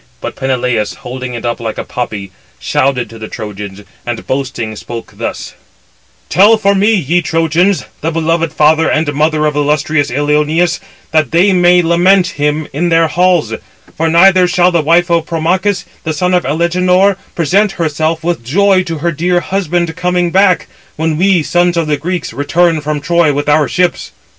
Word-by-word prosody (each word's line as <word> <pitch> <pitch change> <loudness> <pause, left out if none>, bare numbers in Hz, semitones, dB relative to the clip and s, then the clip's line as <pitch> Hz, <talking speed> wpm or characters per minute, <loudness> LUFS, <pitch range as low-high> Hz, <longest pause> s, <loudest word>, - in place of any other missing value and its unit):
But - - -5
he - - -21
(Peneleus), 125 -5 -1
holding 125 0 -7
it 120 - -6
up 120 0 -2
like 115 -2 -5
a - - -3
poppy, 105 -5 -5 0.3
shouted 130 -3 -1
to 115 - -11
the 110 - -7
Trojans, 105 -3 -8 0.2
and 120 -1 -5
boasting 130 -5 -3
spoke 115 +2 -8
thus: - - -5 0.7
"Tell 210 +4 +5
for 200 -2 +2
me, 205 +3 +2
ye 175 -1 +1
Trojans, 165 +4 +1 0.2
the 160 - -1
beloved 165 0 -1
father 155 +1 +3
and 155 -1 0
mother 155 +1 +1
of 150 -1 0
illustrious 150 0 0
Ilioneus, 150 +5 0 0.3
that 155 -4 +2
they 180 +4 +3
may 180 0 +4
lament 180 +2 +3
him 150 -1 -2
in 170 +5 -1
their 165 -1 +3
halls; 180 -2 +1 0.4
for 165 +1 0
neither 180 +2 +5
shall 180 0 +2
the 170 -2 +1
wife 170 +3 +2
of 170 -1 +1
Promachus, 185 +5 -1 0.2
the 160 - -2
son 180 +3 0
of 180 -6 +1
Alegenor, 180 +5 +2 0.2
present 195 +5 +1
herself 160 0 -2
with 170 -7 -2
joy 190 +9 +2
to 165 -2 -4
her 170 - +2
dear 175 +3 0
husband 175 -3 -2
coming 180 -1 0
[back], 185 -1 +3 0.3
when 160 0 -1
we, 180 0 +2
sons 175 +2 +1
of 165 - +1
the 150 -1 0
Greeks, 170 -2 -4
return 155 +5 +1
from 150 0 -3
Troy 170 -1 +2
with 145 0 -2
our 150 -1 +3
ships." 180 +2 -1
165 Hz, 175 wpm, -13 LUFS, 145-180 Hz, 0.7 s, Tell